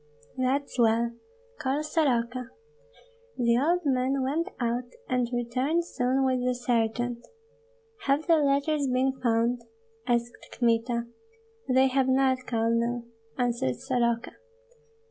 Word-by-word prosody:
"That's 260 Hz, +1 st, -1 dB
well. 230 Hz, 0 st, +3 dB, 0.5 s
Call 285 Hz, +1 st, -1 dB
Soroka!" 255 Hz, -5 st, 0 dB, 0.9 s
The 235 Hz, -2 st, +3 dB
old 340 Hz, +5 st, +1 dB
man 265 Hz, 0 st, +1 dB
went 320 Hz, +8 st, -1 dB
out, 240 Hz, 0 st, -1 dB, 0.2 s
and 250 Hz, -2 st, 0 dB
returned 255 Hz, +8 st, 0 dB
soon 260 Hz, -3 st, 0 dB
with 255 Hz, -1 st, +1 dB
the 250 Hz, 0 st, +1 dB
sergeant. 240 Hz, 0 st, -1 dB, 0.8 s
"Have 280 Hz, +3 st, +2 dB
the 335 Hz, -2 st, +5 dB
letters 285 Hz, 0 st, +1 dB
been 260 Hz, +1 st, +1 dB
found?" 235 Hz, 0 st, +1 dB, 0.5 s
asked 240 Hz, 0 st, -2 dB
Kmita. 235 Hz, 0 st, +1 dB, 0.6 s
"They 260 Hz, +1 st, +5 dB
have 265 Hz, 0 st, +2 dB
not, 260 Hz, -1 st, +2 dB
Colonel," 235 Hz, +1 st, 0 dB, 0.3 s
answered 235 Hz, -, 0 dB
Soroka. 235 Hz, -2 st, -1 dB
250 Hz, 110 wpm, -27 LUFS, 235-270 Hz, 0.9 s, the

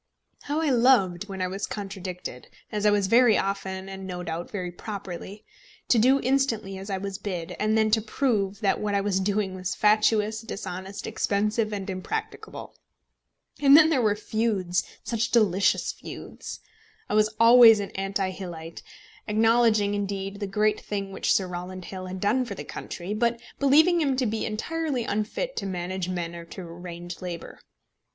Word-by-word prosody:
How 295 Hz, +2 st, -2 dB
I 310 Hz, -3 st, +2 dB
loved, 225 Hz, -7 st, +3 dB
when 190 Hz, -1 st, -3 dB
I -, -, 0 dB
was 195 Hz, +2 st, -4 dB
contradicted, 185 Hz, -, -6 dB, 0.2 s
as 210 Hz, 0 st, +1 dB
I -, -, +7 dB
was 205 Hz, -1 st, +2 dB
very 235 Hz, +2 st, +5 dB
often 190 Hz, -1 st, -3 dB
and 190 Hz, 0 st, -7 dB
no 180 Hz, -1 st, -5 dB
doubt 170 Hz, 0 st, -4 dB
very 180 Hz, -4 st, -4 dB
properly, 200 Hz, +1 st, -7 dB, 0.4 s
to 235 Hz, -, +5 dB
do 260 Hz, +5 st, +5 dB
instantly 230 Hz, -7 st, 0 dB
as 195 Hz, +2 st, -8 dB
I 195 Hz, -, -1 dB
was 195 Hz, +1 st, -5 dB
bid, 180 Hz, -3 st, -4 dB
and 215 Hz, +1 st, +2 dB
then 220 Hz, 0 st, +3 dB
to 220 Hz, 0 st, +4 dB
prove 215 Hz, -4 st, -1 dB
that 200 Hz, -2 st, +2 dB
what 205 Hz, -1 st, -1 dB
I 200 Hz, -, +2 dB
was 195 Hz, -1 st, 0 dB
doing 200 Hz, 0 st, 0 dB
was 185 Hz, 0 st, -4 dB
fatuous, 215 Hz, 0 st, +3 dB
dishonest, 195 Hz, -3 st, -6 dB
expensive, 210 Hz, +2 st, 0 dB
and 200 Hz, -2 st, -4 dB
impracticable! 430 Hz, -, -5 dB, 0.9 s
And 280 Hz, 0 st, +8 dB
then 320 Hz, 0 st, +6 dB
there 270 Hz, -5 st, +3 dB
were 210 Hz, -2 st, +2 dB
feuds, 210 Hz, -5 st, 0 dB, 0.2 s
such 230 Hz, -1 st, -1 dB
delicious 195 Hz, -5 st, +3 dB
feuds! -, -, -9 dB, 0.5 s
I -, -, -4 dB
was 215 Hz, 0 st, +4 dB
always 230 Hz, -1 st, +8 dB
an 200 Hz, -, -4 dB
anti 195 Hz, 0 st, -2 dB
Hillite, 170 Hz, -3 st, -8 dB, 0.5 s
acknowledging, 220 Hz, -1 st, +3 dB
indeed, 200 Hz, -1 st, -3 dB
the 200 Hz, -, -3 dB
great 210 Hz, +2 st, +1 dB
thing 200 Hz, -1 st, -4 dB
which -, -, -1 dB
Sir 190 Hz, -, +3 dB
Rowland 180 Hz, +1 st, -6 dB
Hill 185 Hz, -1 st, -7 dB
had 185 Hz, +1 st, -6 dB
done 210 Hz, +7 st, +2 dB
for 210 Hz, -5 st, -6 dB
the -, -, -6 dB
country, 180 Hz, +3 st, -6 dB
but 235 Hz, +2 st, +1 dB, 0.2 s
believing 315 Hz, +5 st, +5 dB
him 275 Hz, -3 st, +1 dB
to 255 Hz, 0 st, 0 dB
be 220 Hz, 0 st, -1 dB
entirely 280 Hz, +4 st, -2 dB
unfit 220 Hz, -, -2 dB
to -, -, -2 dB
manage 185 Hz, 0 st, -3 dB
men 175 Hz, -2 st, -3 dB
or 170 Hz, 0 st, -8 dB
to 175 Hz, -, -9 dB
arrange 175 Hz, 0 st, -8 dB
labour. 175 Hz, -2 st, -7 dB
205 Hz, 175 wpm, -26 LUFS, 190-225 Hz, 0.9 s, And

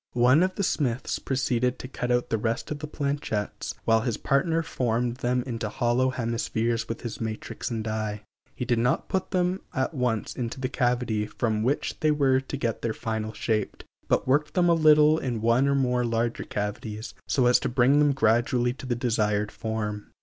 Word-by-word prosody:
One 125 Hz, +6 st, +5 dB
of 185 Hz, 0 st, +1 dB
the 200 Hz, -, -1 dB
smiths 130 Hz, -8 st, -1 dB
proceeded 125 Hz, -2 st, 0 dB
to -, -, -7 dB
cut 125 Hz, -1 st, -4 dB
out 125 Hz, 0 st, +1 dB
the 110 Hz, -, +1 dB
rest 115 Hz, +5 st, -2 dB
of 150 Hz, -, -3 dB
the 150 Hz, -, -5 dB
planchets, 140 Hz, -8 st, -3 dB
while 115 Hz, 0 st, +4 dB
his 115 Hz, -1 st, -1 dB
partner 165 Hz, +4 st, +1 dB
formed 120 Hz, -3 st, -1 dB
them 125 Hz, 0 st, 0 dB
into 115 Hz, -4 st, -4 dB
hollow 120 Hz, +3 st, +1 dB
hemispheres 115 Hz, -1 st, -1 dB
with 115 Hz, -, -4 dB
his 120 Hz, -1 st, -6 dB
matrix 110 Hz, -1 st, -4 dB
and 115 Hz, -2 st, -3 dB
die. 110 Hz, -1 st, -3 dB, 0.3 s
He 125 Hz, -, -3 dB
did 120 Hz, -2 st, +1 dB
not 125 Hz, +2 st, +1 dB
put 190 Hz, -1 st, -1 dB
them 180 Hz, +1 st, 0 dB
at 130 Hz, +4 st, 0 dB
once 125 Hz, -6 st, -1 dB
into 120 Hz, +1 st, -4 dB
the 130 Hz, -1 st, -2 dB
cavity 120 Hz, -4 st, 0 dB
from 110 Hz, -2 st, -1 dB
which 130 Hz, +6 st, -1 dB
they 155 Hz, -, +2 dB
were 140 Hz, -3 st, +3 dB
to 135 Hz, +1 st, -5 dB
get 115 Hz, -4 st, -2 dB
their 115 Hz, -2 st, -2 dB
final 110 Hz, -1 st, -3 dB
shape, 110 Hz, -2 st, -2 dB, 0.2 s
but -, -, +3 dB
first -, -, -21 dB
worked 145 Hz, +3 st, +2 dB
them 175 Hz, -1 st, +4 dB
a -, -, +6 dB
little 155 Hz, -1 st, +5 dB
in 120 Hz, -4 st, -2 dB
one 115 Hz, +5 st, +3 dB
or 140 Hz, -, +2 dB
more 125 Hz, -2 st, +1 dB
larger 115 Hz, 0 st, -1 dB
cavities, 105 Hz, +2 st, -4 dB
so 130 Hz, -, +2 dB
as 125 Hz, 0 st, +5 dB
to -, -, -2 dB
bring 130 Hz, +4 st, +4 dB
them 145 Hz, -1 st, +4 dB
gradually 120 Hz, 0 st, +2 dB
to 130 Hz, -, -9 dB
the 120 Hz, -, 0 dB
desired 105 Hz, -3 st, 0 dB
form. 105 Hz, -2 st, -4 dB
120 Hz, 200 wpm, -26 LUFS, 115-135 Hz, 0.3 s, a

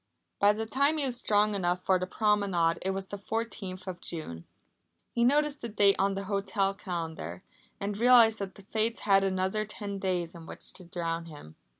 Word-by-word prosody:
By 205 Hz, +1 st, +5 dB
the 220 Hz, +1 st, -3 dB
time 280 Hz, +7 st, +2 dB
he 290 Hz, -, +1 dB
was 255 Hz, -2 st, 0 dB
strong 210 Hz, -2 st, +2 dB
enough 180 Hz, -2 st, -1 dB
for 185 Hz, -1 st, +3 dB
the 185 Hz, -, -3 dB
promenade 195 Hz, -6 st, +1 dB
it 190 Hz, -, -1 dB
was 190 Hz, 0 st, -2 dB
the 200 Hz, +1 st, -7 dB
fourteenth 200 Hz, -4 st, -4 dB
of 185 Hz, -2 st, -6 dB
June. 85 Hz, -, -5 dB, 0.7 s
He 235 Hz, -, +1 dB
noticed 295 Hz, +3 st, +2 dB
the 235 Hz, -, -4 dB
date 205 Hz, -2 st, +4 dB
on 195 Hz, 0 st, +2 dB
the 195 Hz, -, -3 dB
hotel 195 Hz, 0 st, 0 dB
calendar, 165 Hz, -, -5 dB, 0.4 s
and 200 Hz, +1 st, -3 dB
realised 230 Hz, -1 st, +6 dB
that 195 Hz, -1 st, -5 dB
the 200 Hz, -, -12 dB
Fates 220 Hz, +3 st, -1 dB
had 195 Hz, -1 st, +4 dB
another 190 Hz, +2 st, 0 dB
ten 205 Hz, -1 st, -6 dB
days 180 Hz, -3 st, -1 dB
in 165 Hz, -2 st, -11 dB
which -, -, -10 dB
to 185 Hz, -, -11 dB
drown 170 Hz, -1 st, -3 dB
him. 145 Hz, -, -12 dB
195 Hz, 195 wpm, -29 LUFS, 180-215 Hz, 0.7 s, realised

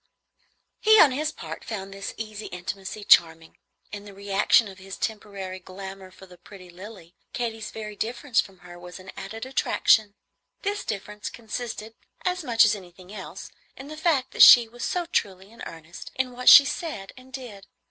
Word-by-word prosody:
He, 435 Hz, 0 st, +6 dB
on 290 Hz, -, +7 dB
his 305 Hz, +4 st, -2 dB
part, 160 Hz, -, -9 dB
found 195 Hz, -3 st, -6 dB
this 195 Hz, 0 st, -7 dB
easy 215 Hz, -1 st, -7 dB
intimacy 190 Hz, +3 st, -7 dB
charming. 165 Hz, -4 st, +3 dB, 0.3 s
In 205 Hz, -1 st, -7 dB
the 205 Hz, -1 st, -13 dB
reaction 200 Hz, +3 st, +2 dB
of 190 Hz, -1 st, -12 dB
his 195 Hz, +1 st, -9 dB
temporary 200 Hz, -3 st, -5 dB
glamour 190 Hz, +1 st, -10 dB
for 190 Hz, -, -15 dB
the 180 Hz, -2 st, -17 dB
pretty 185 Hz, -3 st, -14 dB
Lilly, 185 Hz, -2 st, -12 dB, 0.2 s
Katy's 225 Hz, -3 st, -4 dB
very 215 Hz, -1 st, -8 dB
difference 240 Hz, +3 st, 0 dB
from 190 Hz, -2 st, -15 dB
her 175 Hz, 0 st, -12 dB
was 180 Hz, 0 st, -10 dB
an 185 Hz, +1 st, -11 dB
added 220 Hz, +5 st, -7 dB
attraction. 220 Hz, -5 st, +2 dB, 0.5 s
This 410 Hz, +1 st, -2 dB
difference 210 Hz, 0 st, -5 dB
consisted, 225 Hz, -1 st, -7 dB, 0.3 s
as 365 Hz, -1 st, -1 dB
much 235 Hz, -5 st, +4 dB
as 210 Hz, -, +3 dB
anything 185 Hz, -1 st, -11 dB
else, 190 Hz, -3 st, -9 dB, 0.3 s
in 270 Hz, +2 st, -10 dB
the 310 Hz, -, -7 dB
fact 305 Hz, -5 st, 0 dB
that -, -, -1 dB
she 240 Hz, -2 st, +10 dB
was 240 Hz, +1 st, -10 dB
so 355 Hz, -1 st, -1 dB
truly 195 Hz, -, -3 dB
in 230 Hz, -, -16 dB
earnest 165 Hz, +1 st, -11 dB
in 260 Hz, -1 st, -1 dB
what 250 Hz, 0 st, +3 dB
she 280 Hz, -, +11 dB
said 290 Hz, -, -5 dB
and 255 Hz, +1 st, -16 dB
did. 230 Hz, -7 st, -9 dB
205 Hz, 180 wpm, -25 LUFS, 190-245 Hz, 0.5 s, she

